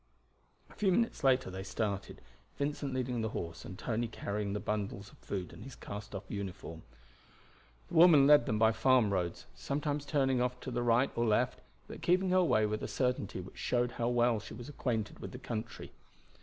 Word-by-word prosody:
A -, -, -17 dB
few 195 Hz, -3 st, +1 dB
minutes 230 Hz, -1 st, +1 dB
later 130 Hz, -6 st, +3 dB
they 95 Hz, +1 st, -5 dB
started, 100 Hz, 0 st, -3 dB, 0.4 s
Vincent 145 Hz, 0 st, -2 dB
leading 125 Hz, -2 st, -1 dB
the 110 Hz, -, -1 dB
horse 85 Hz, -1 st, -6 dB
and 95 Hz, -, -8 dB
Tony 115 Hz, 0 st, -1 dB
carrying 105 Hz, -2 st, -3 dB
the 105 Hz, -, -1 dB
bundle 105 Hz, -1 st, -2 dB
of 100 Hz, +1 st, -12 dB
food 95 Hz, -4 st, -5 dB
and 90 Hz, +5 st, -10 dB
his 135 Hz, 0 st, -9 dB
castoff 105 Hz, -1 st, -7 dB
uniform. 95 Hz, -5 st, -6 dB, 1.1 s
The -, -, -13 dB
woman 160 Hz, -4 st, +8 dB
led 145 Hz, -4 st, +6 dB
them 110 Hz, -, +1 dB
by 110 Hz, +1 st, +5 dB
farm 110 Hz, -2 st, +3 dB
roads, 90 Hz, -2 st, -2 dB
sometimes 145 Hz, 0 st, -2 dB
turning 135 Hz, -4 st, +2 dB
off 125 Hz, 0 st, -1 dB
to 130 Hz, -, -5 dB
the 120 Hz, 0 st, -1 dB
right 120 Hz, +3 st, +3 dB
or 120 Hz, 0 st, +1 dB
left, 105 Hz, -, +2 dB, 0.3 s
but -, -, -9 dB
keeping 185 Hz, +1 st, +2 dB
her 185 Hz, 0 st, +5 dB
way 110 Hz, -10 st, +3 dB
with 105 Hz, 0 st, -2 dB
a -, -, -3 dB
certainty 125 Hz, -7 st, -1 dB
which 90 Hz, -, -12 dB
showed 125 Hz, 0 st, +1 dB
how 115 Hz, 0 st, -2 dB
well 120 Hz, -2 st, +3 dB
she 110 Hz, +2 st, -9 dB
was 120 Hz, +1 st, -9 dB
acquainted 120 Hz, -7 st, -3 dB
with -, -, -7 dB
the -, -, -6 dB
country. 115 Hz, -3 st, -6 dB
115 Hz, 195 wpm, -32 LUFS, 105-135 Hz, 1.1 s, woman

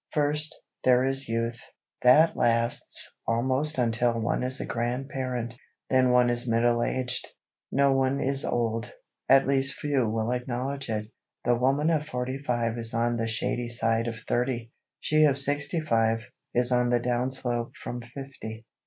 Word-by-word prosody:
First, 150 Hz, 0 st, 0 dB, 0.2 s
there 125 Hz, 0 st, +5 dB
is 135 Hz, -1 st, -1 dB
youth. 115 Hz, +1 st, -2 dB, 0.4 s
That 150 Hz, +6 st, +6 dB
lasts 115 Hz, 0 st, +1 dB
almost 130 Hz, +6 st, 0 dB
until 120 Hz, -1 st, +1 dB
one 115 Hz, -, 0 dB
is 130 Hz, +2 st, -1 dB
a -, -, -3 dB
grandparent; 125 Hz, 0 st, -3 dB, 0.4 s
then 130 Hz, -1 st, +4 dB
one 125 Hz, -1 st, +4 dB
is 120 Hz, 0 st, -2 dB
middle 120 Hz, +1 st, +2 dB
aged. 125 Hz, 0 st, -1 dB, 0.4 s
No 140 Hz, 0 st, +3 dB
one 135 Hz, +1 st, +1 dB
is 135 Hz, 0 st, +1 dB
old,—at 120 Hz, +3 st, 0 dB
least 135 Hz, 0 st, +1 dB
few 140 Hz, -6 st, 0 dB
will 110 Hz, +1 st, -1 dB
acknowledge 125 Hz, +2 st, -3 dB
it. 105 Hz, -1 st, -2 dB, 0.4 s
The 120 Hz, -, +4 dB
woman 135 Hz, +6 st, +2 dB
of 155 Hz, -2 st, 0 dB
forty 125 Hz, 0 st, -3 dB
five 120 Hz, -4 st, -1 dB
is 115 Hz, 0 st, -4 dB
on 120 Hz, +1 st, +1 dB
"the 115 Hz, 0 st, -1 dB
shady 120 Hz, +2 st, -2 dB
side 115 Hz, 0 st, +1 dB
of 115 Hz, -1 st, -4 dB
thirty," 120 Hz, 0 st, -1 dB, 0.3 s
she 155 Hz, 0 st, +3 dB
of 140 Hz, -3 st, +3 dB
sixty 145 Hz, +3 st, 0 dB
five, 115 Hz, -5 st, +1 dB, 0.3 s
is 125 Hz, +1 st, +2 dB
"on 125 Hz, 0 st, +3 dB
the 120 Hz, 0 st, +3 dB
down 125 Hz, +1 st, 0 dB
slope 120 Hz, -3 st, -1 dB
from 120 Hz, 0 st, -6 dB
fifty." 120 Hz, -3 st, -9 dB
125 Hz, 155 wpm, -27 LUFS, 115-135 Hz, 0.4 s, That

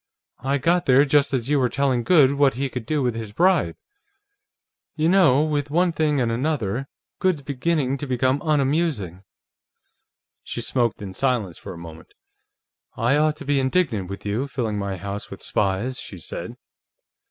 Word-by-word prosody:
"I 135 Hz, +3 st, 0 dB
got 175 Hz, +5 st, +1 dB
there 135 Hz, +2 st, +5 dB
just 145 Hz, 0 st, +3 dB
as 130 Hz, -3 st, -1 dB
you 145 Hz, 0 st, +2 dB
were 125 Hz, -2 st, +2 dB
telling 135 Hz, -2 st, +1 dB
Goode 145 Hz, -3 st, +5 dB
what 140 Hz, -3 st, +3 dB
he 135 Hz, +2 st, -2 dB
could 125 Hz, -3 st, -6 dB
do 150 Hz, -1 st, 0 dB
with 125 Hz, -2 st, +1 dB
his 110 Hz, -2 st, -6 dB
bribe. 185 Hz, -, +2 dB, 1.2 s
You 155 Hz, 0 st, +1 dB
know, 165 Hz, -7 st, +5 dB
with 145 Hz, -2 st, -1 dB
one 175 Hz, +4 st, +2 dB
thing 155 Hz, -3 st, +1 dB
and 120 Hz, -2 st, +1 dB
another, 130 Hz, -2 st, -1 dB, 0.3 s
Goode's 180 Hz, -7 st, +1 dB
beginning 140 Hz, 0 st, -1 dB
to 145 Hz, -, -5 dB
become 130 Hz, +2 st, +1 dB
unamusing." 145 Hz, -, 0 dB, 1.2 s
She -, -, -6 dB
smoked 120 Hz, -5 st, 0 dB
in 95 Hz, -2 st, -7 dB
silence 115 Hz, -7 st, -1 dB
for -, -, -8 dB
a -, -, -10 dB
moment. 80 Hz, -1 st, -12 dB, 0.8 s
"I 120 Hz, +4 st, +2 dB
ought 155 Hz, 0 st, +2 dB
to 145 Hz, -, -9 dB
be 140 Hz, 0 st, +2 dB
indignant 130 Hz, -, 0 dB
with 100 Hz, +1 st, -7 dB
you, 110 Hz, +7 st, -1 dB
filling 115 Hz, -6 st, -2 dB
my 100 Hz, -1 st, -3 dB
house 100 Hz, +2 st, -6 dB
with -, -, -10 dB
spies," 105 Hz, +6 st, -1 dB
she 95 Hz, -, -8 dB
said. 85 Hz, -, -7 dB
135 Hz, 170 wpm, -23 LUFS, 115-150 Hz, 1.2 s, there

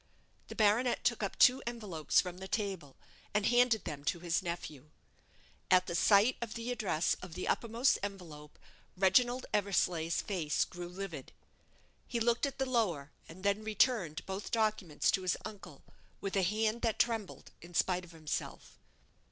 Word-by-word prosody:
The -, -, -8 dB
baronet 225 Hz, +4 st, +2 dB
took 235 Hz, -2 st, +1 dB
up 200 Hz, -, -3 dB
two 255 Hz, 0 st, +6 dB
envelopes 205 Hz, -10 st, 0 dB
from 180 Hz, -1 st, -2 dB
the 190 Hz, -, -7 dB
table, 190 Hz, -10 st, -3 dB, 0.4 s
and 210 Hz, -1 st, +2 dB
handed 245 Hz, -3 st, +4 dB
them 140 Hz, -1 st, -5 dB
to 170 Hz, +1 st, 0 dB
his 170 Hz, 0 st, 0 dB
nephew. 155 Hz, -4 st, -6 dB, 0.8 s
At 185 Hz, 0 st, +5 dB
the 170 Hz, -, -4 dB
sight 200 Hz, +7 st, +4 dB
of 230 Hz, -2 st, -5 dB
the 230 Hz, +1 st, -3 dB
address 200 Hz, -9 st, 0 dB
of 180 Hz, -3 st, -9 dB
the 185 Hz, -, -4 dB
uppermost 235 Hz, +3 st, +2 dB
envelope, 170 Hz, -7 st, -7 dB, 0.4 s
Reginald 240 Hz, +7 st, +3 dB
Eversleigh's 180 Hz, -5 st, +1 dB
face 170 Hz, -7 st, 0 dB
grew 175 Hz, -1 st, -8 dB
livid. 180 Hz, -7 st, -7 dB, 0.7 s
He 235 Hz, -, -2 dB
looked 235 Hz, +4 st, +2 dB
at 275 Hz, -, -7 dB
the 265 Hz, -, 0 dB
lower, 180 Hz, -, 0 dB, 0.2 s
and 180 Hz, +4 st, -12 dB
then 200 Hz, +1 st, +1 dB
returned 215 Hz, -, +1 dB
both 190 Hz, +1 st, -5 dB
documents 215 Hz, -8 st, +1 dB
to 205 Hz, -3 st, 0 dB
his 185 Hz, -1 st, 0 dB
uncle, 210 Hz, -3 st, -10 dB, 0.4 s
with 195 Hz, 0 st, -4 dB
a 195 Hz, -, +3 dB
hand 215 Hz, +4 st, 0 dB
that 225 Hz, -2 st, 0 dB
trembled 230 Hz, -5 st, -1 dB
in 175 Hz, +1 st, -12 dB
spite 180 Hz, +1 st, +1 dB
of 175 Hz, -, -13 dB
himself. 160 Hz, -2 st, -6 dB
195 Hz, 160 wpm, -33 LUFS, 175-225 Hz, 0.8 s, two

